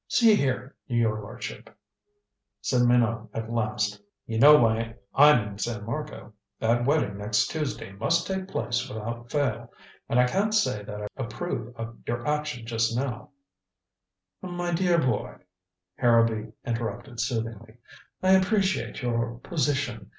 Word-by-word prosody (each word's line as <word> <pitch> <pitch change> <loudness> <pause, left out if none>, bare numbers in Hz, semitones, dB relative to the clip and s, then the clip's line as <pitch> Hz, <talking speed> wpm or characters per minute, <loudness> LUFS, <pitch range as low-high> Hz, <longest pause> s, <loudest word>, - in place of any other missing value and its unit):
"See 230 -3 +5
here, 130 - -1
your 115 -3 +1
lordship," 100 - -8 0.9
said 125 -2 +1
Minot 115 -2 +2
at 115 0 -4
last. 105 -2 -1 0.2
"You 115 -1 -2
know 150 +4 +9
why 115 -2 +1 0.2
I'm 140 -7 +6
in 100 -1 -8
San 105 -1 -3
Marco. 150 -1 -6 0.3
That 120 +2 +2
wedding 130 -9 +1
next 105 0 +1
Tuesday 150 -10 -3
must 165 - +1
take 190 -1 -3
place 120 -10 -2
without 115 +2 -6
fail. 120 -5 -1 0.4
And 120 - +3
I 125 - +6
can't 200 +10 +1
say 205 - +2
that 105 0 -6
I - - -3
approve 120 -1 -4
of 115 0 -7
your 120 0 -2
action 150 -5 -2
just 115 0 0
now 125 -3 -3 0.6
" 95 0 -60 0.2
"My 175 0 -1
dear 175 0 +3
boy," 125 -9 0 0.6
Harrowby 115 -2 +3
interrupted 115 +1 -4
soothingly, 115 -1 -3 0.5
"I 185 - +4
appreciate 190 - +2
your 115 -1 -1
position. 135 - -1
120 Hz, 140 wpm, -27 LUFS, 110-145 Hz, 0.9 s, know